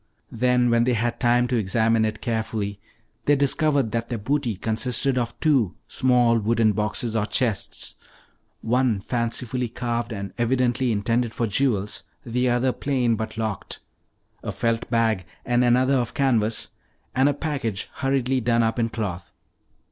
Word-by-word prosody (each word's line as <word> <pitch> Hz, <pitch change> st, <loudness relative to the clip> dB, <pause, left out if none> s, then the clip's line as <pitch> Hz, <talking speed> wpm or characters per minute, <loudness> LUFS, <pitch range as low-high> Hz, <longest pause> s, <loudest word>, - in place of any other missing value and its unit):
Then, 125 Hz, +1 st, +2 dB
when 115 Hz, 0 st, +4 dB
they 125 Hz, -1 st, +2 dB
had 120 Hz, +1 st, -1 dB
time 120 Hz, 0 st, +3 dB
to 125 Hz, -, +1 dB
examine 110 Hz, +2 st, +2 dB
it 110 Hz, 0 st, -3 dB
carefully, 110 Hz, -3 st, -2 dB, 0.5 s
they 145 Hz, -, +5 dB
discovered 140 Hz, -3 st, +2 dB
that 115 Hz, +1 st, -2 dB
their 120 Hz, -, -2 dB
booty 125 Hz, +1 st, -1 dB
consisted 120 Hz, +6 st, 0 dB
of 120 Hz, -1 st, -2 dB
two 135 Hz, -, +2 dB
small 125 Hz, -3 st, +3 dB
wooden 110 Hz, 0 st, +2 dB
boxes 105 Hz, +2 st, -1 dB
or 105 Hz, -1 st, +1 dB
chests, 115 Hz, -6 st, -2 dB, 0.6 s
one 120 Hz, -2 st, +1 dB
fancifully 120 Hz, +2 st, -2 dB
carved 120 Hz, 0 st, -3 dB
and 100 Hz, -3 st, -5 dB
evidently 125 Hz, +1 st, +1 dB
intended 115 Hz, +3 st, 0 dB
for 120 Hz, -, 0 dB
jewels, 105 Hz, -2 st, +1 dB, 0.2 s
the 125 Hz, +1 st, 0 dB
other 125 Hz, +2 st, +2 dB
plain 125 Hz, -4 st, 0 dB
but 110 Hz, 0 st, -5 dB
locked; 110 Hz, -4 st, -3 dB, 0.6 s
a -, -, -4 dB
felt 115 Hz, -1 st, -1 dB
bag 115 Hz, -5 st, +1 dB, 0.2 s
and 120 Hz, 0 st, +2 dB
another 125 Hz, +2 st, +3 dB
of 120 Hz, -2 st, -2 dB
canvas, 115 Hz, -5 st, +1 dB, 0.4 s
and 135 Hz, +2 st, +4 dB
a -, -, +1 dB
package 140 Hz, -, -2 dB
hurriedly 135 Hz, -1 st, +1 dB
done 115 Hz, 0 st, +2 dB
up 115 Hz, +2 st, 0 dB
in 115 Hz, 0 st, +1 dB
cloth. 90 Hz, -6 st, -4 dB
120 Hz, 150 wpm, -24 LUFS, 110-125 Hz, 0.6 s, they